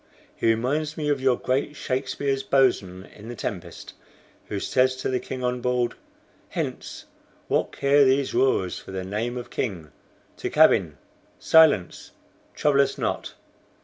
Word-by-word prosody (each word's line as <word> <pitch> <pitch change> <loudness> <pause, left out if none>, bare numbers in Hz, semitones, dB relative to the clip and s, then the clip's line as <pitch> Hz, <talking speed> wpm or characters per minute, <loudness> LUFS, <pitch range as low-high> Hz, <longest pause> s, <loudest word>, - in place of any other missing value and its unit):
"He - - -1
reminds 140 +7 0
me 150 -2 -2
of 140 -2 0
your 130 -2 +3
great 140 +3 -1
Shakespeare's 135 +1 -2
boatswain 120 -9 +1
in 105 +2 -12
the 120 - -6
'Tempest,' 90 -5 -6 0.5
who 100 - -3
says 130 +4 +2
to 130 - -3
the 130 -1 0
king 130 0 -6
on 125 0 -1
board: 125 -1 0 0.6
'Hence! - - -5 0.4
What - - 0
care 140 +1 +3
these 135 0 +2
roarers 95 -9 +1
for - - -14
the 95 -1 -4
name 110 +6 -3
of 120 - -7
king? 85 - -4 0.5
To - - -3
cabin! - - +4 0.4
Silence! 155 - +3 0.4
Trouble 140 -2 +3
us 140 - -1
not. - - -3
130 Hz, 145 wpm, -24 LUFS, 110-140 Hz, 0.6 s, cabin